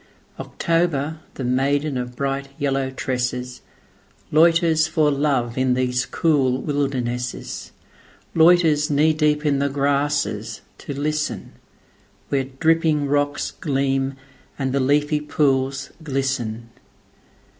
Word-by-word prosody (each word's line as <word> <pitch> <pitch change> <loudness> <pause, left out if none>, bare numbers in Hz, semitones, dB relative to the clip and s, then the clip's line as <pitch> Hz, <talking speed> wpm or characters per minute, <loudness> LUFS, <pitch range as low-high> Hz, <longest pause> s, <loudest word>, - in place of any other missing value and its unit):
October, 160 -2 -1 0.2
the 135 - -5
maiden 140 +3 +1
of 125 -1 -4
bright 140 +1 -2
yellow 135 -1 0
tresses, 125 -1 -3 0.7
Loiters 165 0 +4
for 155 -2 +2
love 135 -4 0
in 130 -1 +2
these 125 0 0
cool 135 -6 +1
wildernesses:Loiters 145 +4 0
knee 155 +2 +3
deep 150 0 +1
in 140 -2 +2
the 140 0 +1
grasses 140 -6 -1 0.2
to 140 -1 -6
listen, 150 0 -2 0.8
Where 135 -1 0
dripping 155 +2 +1
rocks 145 0 0
gleam 135 -2 -1 0.4
and 135 -2 -2
the 140 - +2
leafy 145 +3 +2
pools 135 -2 0
glisten. 130 -6 -3
140 Hz, 100 wpm, -22 LUFS, 130-150 Hz, 0.8 s, Loiters